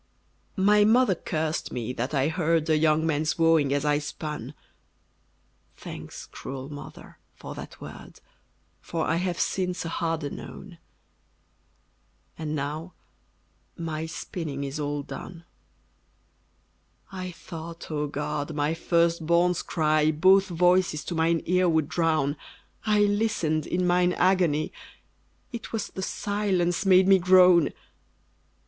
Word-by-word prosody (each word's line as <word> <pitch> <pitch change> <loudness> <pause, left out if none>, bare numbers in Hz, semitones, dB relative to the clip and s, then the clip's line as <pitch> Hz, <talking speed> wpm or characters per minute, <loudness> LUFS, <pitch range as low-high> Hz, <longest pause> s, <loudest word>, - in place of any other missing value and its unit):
My 205 +2 +5
mother 225 0 +4
cursed 160 -2 -3
me 125 0 -3
that 125 +2 -3
I 135 +1 +2
heard 165 -1 +1
A - - +5
young 155 0 +3
man's 155 0 0
wooing 165 -4 +3
as 145 +1 0
I 145 0 +2
spun: 150 0 -6 1.2
Thanks, - - -8
cruel 135 0 -8
mother, 145 - -11 0.2
for - - -8
that - - -10
word, - - -11 0.6
For 165 -1 -3
I 165 - +1
have, 180 -1 -2
since, 180 -2 -1
a - - -3
harder 165 -3 -2
known! 180 -4 -10 1.6
And 155 -1 -4
now 150 +5 -4 0.8
my 160 -2 -4
spinning 155 -3 -5
is 140 +2 -4
all 145 -1 -2
done. 170 +4 -9 1.7
I 185 -1 -5
thought, 165 0 -9
O 150 -1 -1
God! 150 +1 -3
my 150 +1 0
first 170 -1 +1
born's 175 +1 +3
cry 155 -1 +2
Both 190 +5 +5
voices 175 -3 +2
to - - -4
mine 165 0 +1
ear 180 +1 +3
would 160 -3 +2
drown: 155 -4 +1 0.5
I 210 -1 +4
listened 205 -7 +1
in 180 +1 0
mine 180 0 +3
agony, 175 -5 +2 0.8
It 235 -3 -7
was 220 -3 -3
the 190 - -7
silence 195 -3 -1
made 185 0 +6
me 195 -1 +6
groan! 180 -3 +6
165 Hz, 130 wpm, -26 LUFS, 150-180 Hz, 1.7 s, made